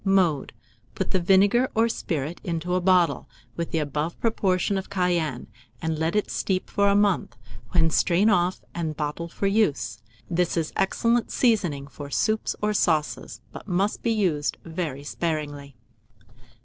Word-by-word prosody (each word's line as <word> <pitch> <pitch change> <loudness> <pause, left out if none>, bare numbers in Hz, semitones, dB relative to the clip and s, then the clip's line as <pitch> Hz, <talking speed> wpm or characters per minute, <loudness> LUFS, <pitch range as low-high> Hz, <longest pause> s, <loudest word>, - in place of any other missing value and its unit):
Mode. 185 -7 +2 0.4
Put - - -2
the 190 - +2
vinegar, 200 +8 +4
or 225 +1 +4
spirit, 160 -7 -3
into 170 +1 -2
a 180 - +2
bottle, 180 -2 +3 0.3
with 170 -1 -3
the - - -1
above 150 +2 -2
proportion 200 -4 +1
of 190 - -9
cayenne, 175 -9 0 0.3
and 160 +1 -2
let 160 +4 0
it 210 - 0
steep 185 -1 -1
for 200 -1 +3
a 200 - +4
month, 205 -2 +2 0.3
when 160 -2 +2
strain 180 +6 +3
off 180 -3 +2
and 160 -3 -3
bottle 150 +2 -3
for 170 - -4
use. 200 -7 +1 0.3
This 175 0 0
is 160 -2 -1
excellent 230 +4 +1
seasoning 180 - +1
for 140 0 -9
soups 215 +8 0
or 210 0 +2
sauces, 160 -6 0
but - - -10
must 195 +2 0
be 235 - 0
used 180 -10 0
very 160 -5 -4
sparingly. 145 -3 -4
175 Hz, 155 wpm, -25 LUFS, 155-200 Hz, 0.4 s, vinegar